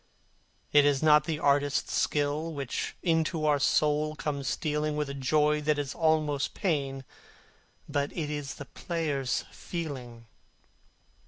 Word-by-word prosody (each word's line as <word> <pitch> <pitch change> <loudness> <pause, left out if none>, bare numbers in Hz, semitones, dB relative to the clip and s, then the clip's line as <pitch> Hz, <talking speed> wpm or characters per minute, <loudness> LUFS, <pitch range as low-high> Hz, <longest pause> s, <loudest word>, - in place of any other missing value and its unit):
It 145 -1 +7
is 145 0 +2
not 150 -1 +6
the 160 -1 -1
artist's 145 -1 +1
skill 150 +2 0
which 140 -3 -3
into 160 -2 +1
our 145 -1 +3
soul 150 +2 +2
comes 140 -3 -3
stealing 150 +2 -1
With 150 -2 -1
a - - -5
joy 150 +2 +2
that 150 0 +1
is 145 -1 -3
almost 155 -3 +1
pain, 140 -7 -1 0.8
but 145 -1 -1
it 150 -3 -2
is 145 -2 -4
the 145 - -8
player's 145 -2 -2
feeling. 130 -9 -6
150 Hz, 135 wpm, -29 LUFS, 140-155 Hz, 0.8 s, It